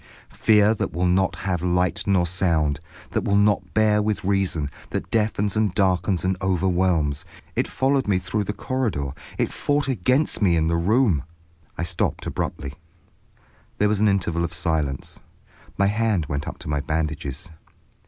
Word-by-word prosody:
Fear 105 0 +4
that 105 - -3
will 90 +3 0
not 95 +1 +2
have 90 -3 -2
light 90 +2 0
nor 95 -3 +3
sound, 80 -5 +1 0.3
that - - -1
will 100 - +1
not 105 0 +2
bear 105 -1 +4
with 105 0 -1
reason, 95 -7 0 0.2
that - - -4
deafens 105 -2 +1
and 105 -4 +1
darkens 95 -1 +1
and 95 0 +1
overwhelms. 90 -5 +1 0.3
It - - +1
followed 135 -1 +1
me 100 -3 +3
through 95 +3 -2
the 105 - -2
corridor, 105 - -2 0.3
it - - -1
fought 145 0 0
against 130 - +1
me 90 -4 +4
in 80 - +2
the 85 +1 +1
room—" 95 - +2 0.6
I 85 - -2
stopped 85 0 -2
abruptly. 70 -1 -4 1.0
There 105 - +3
was 105 -1 +1
an 110 - +4
interval 85 -4 +1
of 85 0 -3
silence. 80 -6 -2 0.6
My 100 - +3
hand 105 -4 +1
went 70 0 -3
up - - -5
to - - -9
my 75 -1 0
bandages. 75 0 -3
95 Hz, 165 wpm, -23 LUFS, 85-105 Hz, 1.0 s, Fear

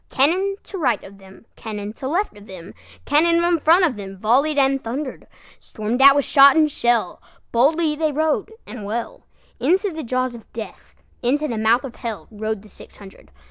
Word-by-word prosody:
Cannon 365 +9 +1
to 390 - -8
right 245 -9 0
of 195 +1 -14
them, 195 +3 -17
Cannon 210 -1 -6
to 260 +3 -6
left 350 - -1
of 205 0 -15
them, 185 -1 -11 0.3
Cannon 335 +4 +3
in 345 -1 +2
front 335 +5 +4
of 310 - 0
themVolley'd 215 +10 0
and 270 -1 +2
thunder'd; 260 +4 -5 0.3
Storm'd 220 +4 -4
at 275 0 +8
with 285 - +1
shot 275 -1 +6
and 310 -2 +3
shell, 235 -7 0 0.3
Boldly 300 +6 +2
they 310 0 0
rode 310 +7 -1
and 235 -4 -9
well, 225 +3 -5 0.3
Into 370 - +1
the 320 -1 -6
jaws 255 +1 -1
of 230 -3 -13
Death, 220 -2 -9 0.3
Into 290 +5 0
the 230 -5 -3
mouth 225 +3 +2
of 270 - -6
HellRode 220 -2 -6
the - - -15
six 205 - -12
hundred. 195 -2 -15
255 Hz, 180 wpm, -21 LUFS, 220-305 Hz, 0.3 s, at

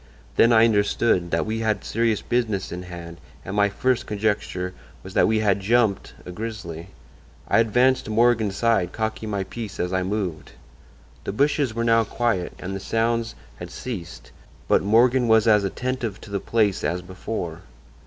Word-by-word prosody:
Then 115 - +5
I 115 -1 +6
understood 100 -4 +2
that 85 0 0
we 110 +1 -2
had 110 -2 0
serious 115 -1 0
business 110 -6 -1
in 90 - -5
hand 85 -2 -9 0.3
and 95 - -5
my 100 -1 +3
first 125 +5 0
conjecture 100 -3 -2 0.3
was - - -10
that - - +4
we 110 0 +2
had 100 -2 +2
'jumped' 110 0 +1
a 90 - -7
grizzly. 90 -5 -6 0.6
I - - +3
advanced 125 +3 +3
to - - -7
Morgan's 110 -3 +2
side, 115 -7 +1
cocking 110 0 -3
my 100 -2 -1
piece 110 0 -7
as 90 +1 -1
I 95 - +1
moved. 95 -4 -3 0.7
"The - - -3
bushes 140 -1 +1
were 115 - -1
now 115 -1 +4
quiet 110 -5 -1
and 95 +1 -5
the - - -4
sounds 115 +2 -1 0.2
had - - -8
ceased, 95 -9 -7 0.4
but - - +4
Morgan 120 +4 +3
was 110 0 +4
as 105 -2 +5
attentive 115 +1 -3
to 105 - -12
the 100 - -1
place 105 -2 +1
as 90 +1 -1
before. 90 -2 -5
110 Hz, 175 wpm, -23 LUFS, 95-115 Hz, 0.7 s, I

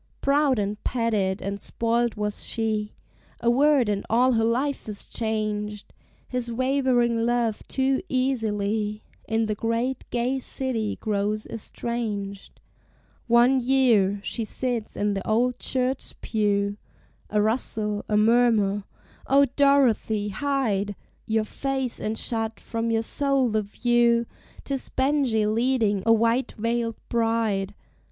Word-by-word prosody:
Proud 280 -1 +2
and 205 0 -2
petted 215 -6 0
and 200 +1 -3
spoiled 235 +1 0
was 210 0 -3
she: 215 -2 -2 0.4
A 235 - +2
word, 275 -1 +4
and 205 -1 -1
all 245 +3 +4
her 225 -2 +2
life 250 +2 -1
is 205 - -4
changed! 210 -2 -3 0.3
His 250 -2 -3
wavering 250 -2 +1
love 235 -2 0
too 265 0 +1
easily 215 -5 -1 0.2
In 225 0 +1
the 215 - -1
great, 230 +4 -1
gay 250 +2 0
city 245 -5 -2
grows 210 0 -1
estranged: 210 -3 -4 0.7
One 240 +3 +5
year: 240 -6 +3
she 230 - -3
sits 235 0 -3
in 205 0 +1
the 195 - -4
old 245 +3 +1
church 260 0 -2
pew; 205 -2 0 0.5
A 210 - +1
rustle, 210 -1 -1
a 210 - +2
murmur, 215 -3 +3 0.4
O 280 +1 +5
Dorothy! 245 -7 +3
hide 215 -5 -1 0.3
Your 220 0 +1
face 265 +2 -3
and 215 +1 -2
shut 225 -2 0
from 230 0 -3
your 225 0 +1
soul 275 0 +2
the 215 0 +1
view 235 +2 +2 0.4
'Tis 275 -2 -3
Benjie 260 -5 +1
leading 220 -2 +1
a - - +6
white 230 +3 +2
veiled 230 0 -1
bride! 225 -4 0
230 Hz, 125 wpm, -25 LUFS, 210-250 Hz, 0.7 s, a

